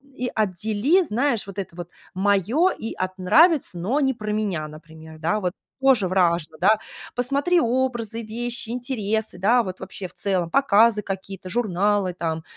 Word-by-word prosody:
и 250 -1 -2
отдели, 215 - +1
знаешь, 245 -3 0
вот 195 0 -9
это 185 -3 -6
вот 175 -1 -7 0.2
"моё" 205 - +2
и 225 - -6
от 185 0 -4
"нравится, 280 - +4
но 210 +12 0
не 265 -2 +2
про 215 -3 -5
меня", 200 -8 -1
например, 160 +1 -13
да, 170 +7 0
вот 180 -2 -1 0.3
тоже 255 -9 +4
важно, 170 -4 +1
да. 210 +4 +4 0.4
Посмотри 280 +8 +2
образы, 235 -3 -1
вещи, 235 +1 -5
интересы, 220 -5 -2
да, 230 +7 +3
вот 185 -3 -6
вообще 190 0 -7
в 180 - -19
целом 185 -4 -1
показы 225 -1 +4
какие-то, 195 -1 -6
журналы 205 -3 +1
там, 165 -2 -3
205 Hz, 160 wpm, -23 LUFS, 185-240 Hz, 0.4 s, нравится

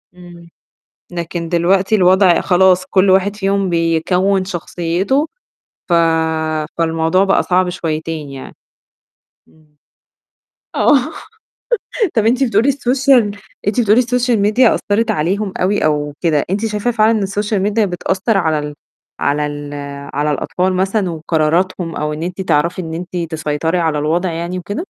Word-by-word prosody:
إمم. 175 -1 -14 0.6
لكن 170 -1 -4
دلوقتي 185 +4 +2
الوضع 185 -2 +4
خلاص 185 0 +3
كل 190 0 +3
واحد 195 +2 +3
فيهم 195 -1 0
بيكوّن 180 +3 +1
شخصيته 185 - -1 0.6
ف 175 - +2 0.8
فالموضوع 165 +2 +1
بقى 195 0 +2
صعب 180 0 +1
شويتين 160 -3 -4
يعني، 135 -1 -10 0.9
إمم. 155 -1 -27 1.0
آه. 300 - +4 1.2
طَب 220 -2 +2
أنتِ 255 +4 +3
بتقولي 230 +2 +2
السوشيال 255 -5 +2 0.3
أنتِ 205 +4 +1
بتقولي 215 0 +4
السوشيال 245 -1 +1
ميديا 220 +4 +4
أثّرت 210 +3 0
عليهم 190 +6 -1
أوي 195 +1 +1
أو 150 -1 0
كده، 155 -4 +1
أنتِ 205 +4 -1
شايفة 210 +2 -1
فعلًا 220 -1 +3
إن - - -2
السوشيال 205 +1 -1
ميديا 210 +2 +1
بتأثّر 190 +4 -1
على 160 -4 +1
ال 150 0 -5 0.5
على 150 +1 0
ال 145 0 -6 0.4
على 150 +2 0
الأطفال 180 +5 -1
مثلًا 190 +1 0
وقراراتهم 165 +2 -1
أو 150 0 -2
إن 150 - -6
أنتِ 180 +2 -4
تعرفي 170 +1 0
إن 160 -1 -6
أنتِ 175 0 -5
تسيطري 160 +2 -1
على 160 -3 0
الوضع 170 +4 0
يعني 170 +2 -4
وكده؟ 190 +4 -6
180 Hz, 135 wpm, -16 LUFS, 165-205 Hz, 1.2 s, الوضع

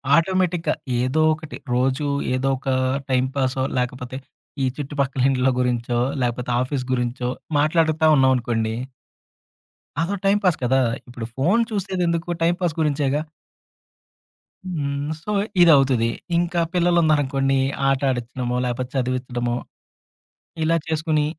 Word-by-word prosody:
ఆటోమేటిక్‌గా 180 0 +1 0.3
ఏదో 130 +5 +1
ఒకటి 155 -1 -8 0.2
రోజు, 130 +3 +1 0.3
ఏదో 135 +1 0
ఒక 135 - -5 0.4
టైంపాసో 130 0 0
లేకపోతే 125 +1 -3 0.5
ఈ - - +3
చుట్టుపక్కల 140 -2 -2
ఇండ్ల 130 -1 +2
గురించో, 120 -1 0 0.2
లేకపోతే 125 0 -1
ఆఫీస్ 130 0 -2
గురించో 125 0 -1 0.3
మాట్లాడతా 160 +1 +2
ఉన్నాం 130 -1 +4
అనుకోండి 115 -2 -1 1.3
అదో 170 +5 0
టైంపాస్ 195 -4 +3
కదా! 130 +2 +3 0.3
ఇప్పుడు 120 -2 -6
ఫోన్ 190 - +3
చూసేది 190 -3 -2
ఎందుకు? 170 0 -1
టైంపాస్ 175 -1 +1
గురించే‌గా. 145 -1 +1 1.4
హ్మ్. 145 -4 -3
సో, 210 - -3 0.3
ఇదవుతది. 135 -8 +5 0.3
ఇంకా 175 0 0
పిల్లలున్నారనుకోండీ, 150 -6 +2 0.3
ఆట 135 -1 +2
ఆడిచ్చడమో, 125 0 -3
లేపోతే 125 +1 -3
చదివిచ్చడమో 125 -1 -1 1.1
ఇలా 165 +1 +3
చేసుకొని 155 -1 0
135 Hz, 105 wpm, -22 LUFS, 125-160 Hz, 1.4 s, ఇదవుతది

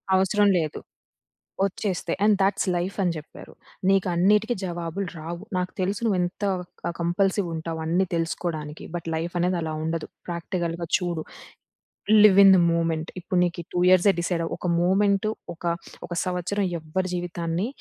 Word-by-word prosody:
అవసరం 195 +2 +3
లేదు. 155 -3 -2 0.9
ఒచ్చేస్తే 190 -3 -2
"and 210 0 +5
that's 195 +2 +2
life" 175 +3 -2
అని 175 -2 +2
జెప్పారు. 155 0 -10 0.4
"నీకన్నిటికి 195 +4 +3
జవాబులు 175 +1 -3
రావు. 170 +4 -6
నాకు 180 0 -1
తెలుసు 195 +2 -1
నువ్వు 205 -5 +2
ఎంత 175 +3 -4 0.4
క - - -1
కంపల్సివ్ 190 +3 +1
ఉంటావు. 160 0 -4
అన్ని 175 +4 +2
తెలుసుకోవడానికి. 165 -2 -3
బట్ 170 -1 -4
లైఫ్ 165 +2 -3
అనేది 180 +1 +1
అలా 160 -1 -3
ఉండదు. 160 0 -2 0.2
ప్రాక్టికల్‌గా 170 0 -3
చూడు. 175 -3 -2 1.0
Live 195 -2 +7
in 195 - +9
the - - +4
movement. 165 -1 0
ఇప్పుడు 180 +1 -1
నీకీ 170 -1 -3
2 175 - +1
ఇయర్సె 185 +2 +6
డిసైడ్ 170 0 -1
అవ్వు. 165 - -3
ఒక 180 - -3
మూవ్మెంటు, 200 +3 +2 0.2
ఒక 170 - -18 0.4
ఒక - - -10
సంవత్సరం 185 +3 -1 0.2
ఎవ్వరి 185 +4 -2
జీవితాన్ని 175 +1 -2
175 Hz, 150 wpm, -25 LUFS, 165-190 Hz, 1.0 s, in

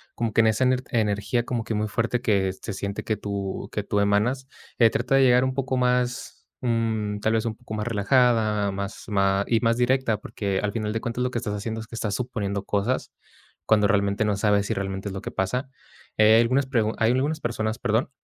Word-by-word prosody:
como 115 -2 -2
que 115 - +5
en 110 - +3
esa 110 +3 +2
ener 130 0 +2
energía 110 +2 0
como 120 -2 -2
que 115 - -4
muy 105 0 0
fuerte 120 +3 -1
que, 100 -5 +1
se 105 - -7
siente 100 +1 -4
que 110 - -1
tú 100 -1 -4
que 105 - -3
tú 105 0 -1
emanas, 110 +6 +1 0.3
eh, 115 -2 +7
trata 125 +3 0
de 135 - +5
llegar 125 0 +5
un 130 - -1
poco 130 -1 -1
más, 125 0 -1
mm, 110 -4 -1
tal 110 +1 +1
vez, 110 0 +1
un 110 -1 -2
poco 110 - -10
más 105 +2 -3
relajada, 110 -2 +2
más 100 0 -5
ma 100 -1 +2
y 115 - +2
más 115 -1 +2
directa, 125 -3 +1
porque, 100 -2 -3
al 105 - 0
final 110 -2 -2
de 115 - -2
cuentas, 120 +1 -2
lo 125 - 0
que - - -2
estás 105 -4 -4
haciendo 110 +2 -4
es - - -8
que - - -18
estás 105 -3 -2
suponiendo 105 -6 -3
cosas, 105 +5 -1 0.6
cuando 105 -2 +4
realmente 100 0 +1
no 105 -1 +1
sabes 105 0 +2
si - - 0
realmente 95 0 -4
es - - -6
lo 95 - -5
que - - -5
pasa, 125 +8 -2 0.5
eh, 110 +1 +6
hay - - +6
algunas 130 +4 +2
pregun 110 -4 0
hay 110 +1 +3
algunas 145 +5 0
personas, 110 -1 -2
perdón, 115 +2 0
110 Hz, 225 wpm, -25 LUFS, 100-125 Hz, 0.6 s, eh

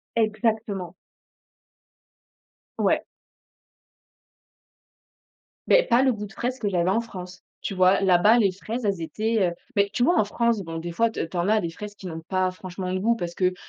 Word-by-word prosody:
Exactement. 215 -5 -1 1.8
Ouais. - - +2 2.6
Mais - - +6
pas 240 +2 +3
le 260 -2 +3
goût 210 -1 -5
de - - -16
fraise 250 +1 -3
que 205 -3 -1
j'avais 175 -1 +1
en 225 +5 +2
France. 185 -5 -9 0.2
Tu - - -3
vois, 185 +1 +4
là-bas, 195 +5 +5
les 200 -5 +3
fraises, 220 +5 -5
elles 195 -4 0
étaient, 215 +3 0
heu - - -6 0.2
mais, 200 -1 +3
tu 240 +3 0
vois, 345 0 +4
en - - +5
France, 235 +1 0
bon, 165 0 -6
des 170 +1 -5
fois 230 +6 +2
te - - -7
tu 165 +3 -11
en 175 +4 +1
as 215 0 +3
des 170 -1 -3
fraises 205 +4 -8
qui 195 - -13
n'ont 165 -2 -5
pas 185 -1 +1
franchement 185 0 -6
de 185 - 0
goût, 230 +4 +2
parce 175 -5 -4
qu'elles 185 0 +1
200 Hz, 185 wpm, -25 LUFS, 180-225 Hz, 2.6 s, Mais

